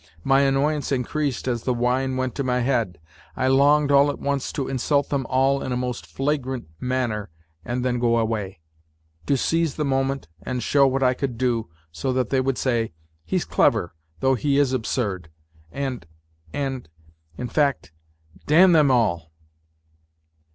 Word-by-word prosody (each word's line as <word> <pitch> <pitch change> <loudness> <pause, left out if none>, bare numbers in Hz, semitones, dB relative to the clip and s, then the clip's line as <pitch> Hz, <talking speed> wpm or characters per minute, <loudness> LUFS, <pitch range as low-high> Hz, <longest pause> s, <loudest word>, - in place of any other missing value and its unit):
My 135 0 +4
annoyance 140 +2 +1
increased 135 +1 -1
as 120 -2 -1
the 125 +1 -1
wine 130 +2 0
went 130 -1 -1
to 140 - -2
my 125 -1 0
head. 120 -7 0 0.4
I - - 0
longed 145 +2 +4
all 140 +1 +5
at 145 - -3
once 140 -1 -2
to 140 -3 -2
insult 140 +2 0
them 135 -4 -1
all 135 +1 +2
in 130 - -4
a 125 - 0
most 125 -1 -4
flagrant 130 - -2
manner 125 -5 -2 0.3
and 125 +1 -3
then 125 -1 0
go 120 -1 +2
away. 105 -6 -2 0.7
To 140 - +3
seize 165 +2 0
the 150 - -1
moment 135 -3 -1
and 125 -2 -3
show 140 +1 +4
what 135 +1 0
I 125 0 +4
could 130 -2 -3
do, 115 -5 0 0.2
so 80 +11 -2
that 125 -2 -1
they 135 -1 +3
would 135 0 -1
say, 115 -6 0 0.2
" - - -47
He's 80 - -1
clever, 85 - +2 0.3
though 135 0 +3
he 140 +2 +1
is 140 -2 +2
absurd," 105 -8 -2 0.4
and... 130 -10 -4 0.4
and... 135 - -4 0.5
in 125 - -4
fact, 140 - 0 0.6
damn 180 +5 +6
them 155 -4 +5
all! 95 -10 +1
130 Hz, 165 wpm, -23 LUFS, 120-140 Hz, 0.7 s, damn